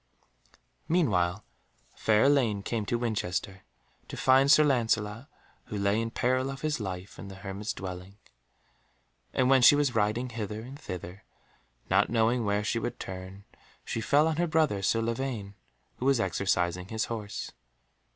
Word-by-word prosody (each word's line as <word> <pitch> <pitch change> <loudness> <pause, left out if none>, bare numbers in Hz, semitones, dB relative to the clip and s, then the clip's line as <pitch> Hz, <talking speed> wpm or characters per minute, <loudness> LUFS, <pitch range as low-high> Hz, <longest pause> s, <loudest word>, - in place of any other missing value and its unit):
Meanwhile 100 - +1 0.5
fair 110 0 +2
Elaine 125 -8 +3
came 110 -2 -3
to 120 - 0
Winchester 95 -5 -2 0.5
to - - -8
find 135 +1 +4
Sir 155 - +7
Lancelot, 115 -3 0 0.4
who 105 - -5
lay 100 +2 +1
in 115 - -2
peril 130 +3 0
of 135 0 -7
his 155 -3 -1
life 95 -2 -6
in 100 - -8
the 95 - -9
hermit's 100 +2 -5
dwelling. 95 +1 -7 1.1
And 130 - +2
when 135 0 +5
she 135 - +8
was 145 -3 +1
riding 110 +4 0
hither 110 -2 -5
and 135 +5 -10
thither, 90 - -8 0.6
not - - +3
knowing 115 +1 +2
where 105 0 +1
she 115 +2 0
should 120 - -4
turn, 95 +1 -8 0.4
she 115 - -3
fell 145 +7 +3
on 160 -1 -1
her 175 +1 +1
brother 155 -11 +1
Sir 115 +4 +1
Lavaine, 115 -3 -3 0.4
who 125 - -4
was 135 -3 +4
exercising 90 -2 0
his 110 +1 -2
horse. 110 -3 -5
110 Hz, 155 wpm, -29 LUFS, 100-130 Hz, 1.1 s, she